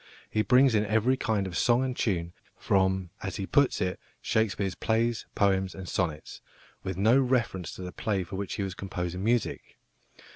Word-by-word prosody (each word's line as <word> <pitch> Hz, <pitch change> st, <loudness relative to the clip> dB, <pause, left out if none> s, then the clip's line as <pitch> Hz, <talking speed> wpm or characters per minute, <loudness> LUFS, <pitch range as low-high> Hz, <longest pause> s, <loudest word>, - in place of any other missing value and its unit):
He 110 Hz, -, +2 dB
brings 125 Hz, +2 st, +5 dB
in 105 Hz, -1 st, +3 dB
every 110 Hz, +5 st, +3 dB
kind 110 Hz, -6 st, 0 dB
of 90 Hz, -2 st, -6 dB
song 120 Hz, +8 st, +3 dB
and 130 Hz, -1 st, -2 dB
tune, 85 Hz, -7 st, -1 dB, 0.2 s
from, 95 Hz, -2 st, +1 dB
as 95 Hz, -4 st, -4 dB
he 100 Hz, -, -3 dB
puts 140 Hz, +5 st, +2 dB
it, 90 Hz, -1 st, -1 dB, 0.2 s
"Shakespeare's 105 Hz, -4 st, 0 dB
Plays, 115 Hz, +2 st, 0 dB
Poems, 95 Hz, -2 st, +1 dB
and 95 Hz, -1 st, -8 dB
Sonnets," 80 Hz, -5 st, -3 dB, 0.4 s
with 95 Hz, -2 st, -4 dB
no 110 Hz, +7 st, +5 dB
reference 120 Hz, -, 0 dB
to 95 Hz, -, -8 dB
the 90 Hz, -, -6 dB
play 100 Hz, -2 st, -1 dB
for 90 Hz, +2 st, -8 dB
which 100 Hz, 0 st, -3 dB
he 100 Hz, -, -2 dB
was 95 Hz, -1 st, -3 dB
composing 90 Hz, -1 st, -4 dB
music. 120 Hz, +2 st, -1 dB
100 Hz, 180 wpm, -28 LUFS, 95-115 Hz, 0.4 s, brings